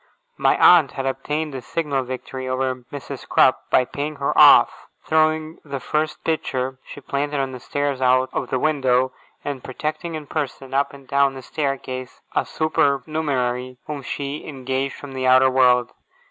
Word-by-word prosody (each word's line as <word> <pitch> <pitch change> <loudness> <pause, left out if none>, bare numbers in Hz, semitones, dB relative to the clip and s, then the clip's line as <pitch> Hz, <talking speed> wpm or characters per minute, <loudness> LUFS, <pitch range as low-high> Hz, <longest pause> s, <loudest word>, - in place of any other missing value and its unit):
My - - +3
aunt 165 -7 +6
had 135 - -4
obtained 150 +3 -2
a 130 - -5
signal 145 -1 -2
victory 130 +1 -6
over 130 0 0 0.2
Mrs. 145 -2 -8
Crupp, - - +3
by 125 - +4
paying 145 +4 -4
her 140 -1 -1
off, - - +6 0.2
throwing 155 0 +1
the 140 - -5
first 155 +3 -2
pitcher 130 -5 -2
she - - -10
planted 145 +1 -2
on 135 -1 -1
the 130 - -8
stairs 145 +1 -2
out 130 0 +3
of - - -3
window, 130 -2 +2 0.3
and 140 -3 -4
protecting 155 +5 -4
in 155 -1 -6
person, 135 -3 -4
up 140 +1 +1
and 140 -2 -14
down 140 0 +2
the 130 - -9
staircase, 130 -4 -4 0.2
a - - +2
supernumerary 140 -5 0
whom 150 -2 -5
she 140 +2 -5
engaged 135 -1 -3
from 145 - -10
the 130 -1 -1
outer 130 +1 +6
world. 125 -2 +4
135 Hz, 160 wpm, -22 LUFS, 130-150 Hz, 0.3 s, aunt